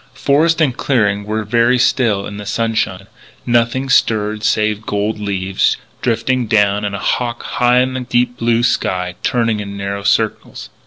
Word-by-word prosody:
Forest 160 +4 +2
and 135 -6 +2
clearing 105 -7 0
were 110 +1 -2
very 120 +3 +2
still 115 -5 +1
in 100 - -7
the 105 - -7
sunshine. 110 -4 -1 0.4
Nothing 120 +2 +1
stirred 110 -4 +1
save 105 0 +1
gold 105 +1 -2
leaves 95 -2 0 0.2
drifting 120 +1 0
down, 105 -1 +2
and 100 -1 -2
a - - -5
hawk 120 +3 -2
high 125 0 +2
in 130 0 -1
the 130 - -3
deep 125 0 0
blue 115 0 +1
sky 90 -6 0
turning 115 -3 0
in 100 -1 -6
narrow 100 0 -4
circles. 100 - -1
110 Hz, 160 wpm, -17 LUFS, 100-125 Hz, 0.4 s, Forest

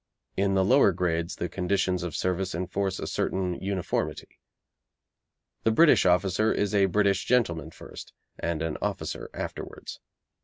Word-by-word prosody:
In 100 0 +1
the 95 -1 +3
lower 100 0 +5
grades 85 -1 -1
the 85 - -3
conditions 90 0 0
of 90 -3 -4
service 95 -1 -1
enforce 95 +2 -2
a - - -5
certain 95 -1 -1
uniformity. 95 -2 -3 1.2
The - - +3
British 145 - +5
officer 95 +4 +2
is 105 -1 0
a 100 -1 +4
British 100 0 +1
gentleman 85 -11 +1
first, - - -11 0.3
and 85 -2 -2
an 80 -2 -3
officer - - -3
afterwards. - - -7
95 Hz, 140 wpm, -27 LUFS, 90-100 Hz, 1.2 s, lower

